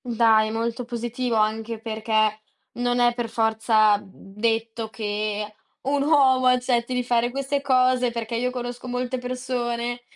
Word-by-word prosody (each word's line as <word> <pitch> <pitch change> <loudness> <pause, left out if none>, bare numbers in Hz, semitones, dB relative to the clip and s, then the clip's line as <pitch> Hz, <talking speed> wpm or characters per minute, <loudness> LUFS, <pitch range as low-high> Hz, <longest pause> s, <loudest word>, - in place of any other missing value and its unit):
Dai, 225 -2 +3
molto 230 +2 -2
positivo, 240 0 -3
anche 220 +1 0
perché 215 -1 0 0.3
non 245 0 0
è 240 0 +4
per 240 -1 -4
forza 220 -2 +3
detto 225 +3 -3
che 210 -1 -3 0.3
un 280 +1 0
uomo 270 -3 +4
accetti 250 -1 +1
di 250 - 0
fare 240 -1 +1
queste 275 +2 -2
cose, 255 -2 +3
perché 235 -1 -4
io 250 +2 0
conosco 245 0 -6
molte 250 +1 -2
persone 245 -1 -3
235 Hz, 135 wpm, -24 LUFS, 220-250 Hz, 0.3 s, è